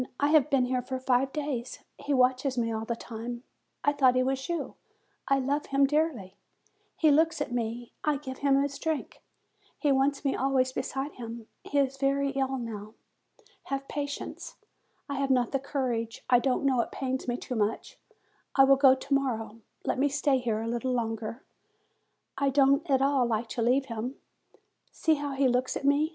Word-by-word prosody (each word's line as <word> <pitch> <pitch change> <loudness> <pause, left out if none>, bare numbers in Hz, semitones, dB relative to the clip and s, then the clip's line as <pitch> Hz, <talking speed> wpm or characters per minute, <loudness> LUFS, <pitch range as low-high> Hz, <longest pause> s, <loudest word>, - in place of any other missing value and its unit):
I 285 - +3
have 300 -2 +4
been 270 -3 +3
here 250 0 0
for 260 +1 -4
five 260 +1 +1
days. 275 -5 -3 0.2
He 290 - -4
watches 255 0 +2
me 230 -1 0
all 220 0 -3
the 235 - -2
time. 235 +1 -7 0.4
I 285 - +3
thought 260 -3 +4
he 255 - +3
was 265 +2 -2
you. 340 -1 -2 0.5
I 275 - +3
love 275 +2 -1
him 275 0 +3
dearly. 275 - -1 0.6
He 310 -2 +4
looks 320 +3 +3
at - - -3
me; 235 0 -3
I 300 -2 +1
give 260 -2 -8
him 275 -1 +3
his 280 -1 -4
drink; 315 -2 -3 0.6
he 290 - +1
wants 275 +2 +1
me 275 - +1
always 260 -1 +1
beside 270 +2 -3
him; 230 -1 -7 0.2
he 290 - -3
is 270 -1 +2
very 275 0 +1
ill 270 -1 -1
now. 220 -3 -7 0.7
Have 275 0 -3
patience; 285 -1 -5 0.5
I 280 -2 -3
have 275 -1 0
not 250 -3 +2
the 270 - 0
courage 245 -5 -3
I 245 - +7
don't 260 +2 0
know 260 -3 +3
it - - -5
pains 260 -1 -3
me 240 0 -1
too 250 - -6
much; 220 -1 -2 0.6
I 270 - +7
will 270 0 +6
go 265 -1 +7
to 275 +2 -4
morrow; 230 -5 -1 0.3
let - - 0
me 285 +2 +3
stay 280 -1 +2
here 225 -3 -1
a - - -4
little 240 +2 -1
longer; 230 0 -3 1.0
I 280 0 +2
don't 275 +1 +3
at 265 -1 +3
all 275 -3 +3
like 225 0 -1
to 240 - -3
leave 255 +4 +3
him. 240 +1 -4 0.8
See 320 - +2
how 285 -1 -3
he 270 0 +2
looks 250 +1 +1
at - - -6
me 285 +2 +3
265 Hz, 190 wpm, -28 LUFS, 245-280 Hz, 1.0 s, I